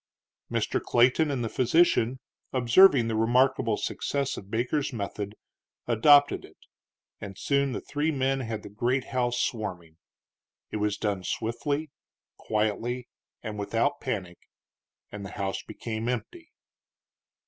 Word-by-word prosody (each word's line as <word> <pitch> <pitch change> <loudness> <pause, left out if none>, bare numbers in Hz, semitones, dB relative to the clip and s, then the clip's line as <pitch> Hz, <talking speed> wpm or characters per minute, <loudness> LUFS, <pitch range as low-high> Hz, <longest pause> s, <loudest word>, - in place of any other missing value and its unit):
Mr. - - 0
Clayton 125 +6 +3
and 135 -4 -1
the - - -1
physician, 130 +1 +3 0.4
observing 130 +1 +6
the 115 - -1
remarkable 120 0 +2
success 140 -1 -2
of 95 - -10
Baker's 120 +7 -1
method, 105 -2 -5 0.5
adopted 145 +5 +5
it, - - -15 0.6
and 100 -2 -8
soon 140 +2 +1
the - - -4
three 150 +2 -1
men 135 -2 0
had 115 -4 -4
the - - -9
great 120 +6 0
house 120 -1 +1
swarming. 90 -8 -3 0.7
It - - -2
was 105 -1 0
done 100 -3 -2
swiftly, 140 +9 -2 0.4
quietly, 115 +3 -2 0.3
and 105 -2 -5
without 115 +7 0
panic, 95 -9 -4 0.7
and 105 -1 -7
the 95 - -6
house 95 -1 -2
became 115 0 -5
empty. 320 - -5
120 Hz, 125 wpm, -27 LUFS, 105-135 Hz, 0.7 s, observing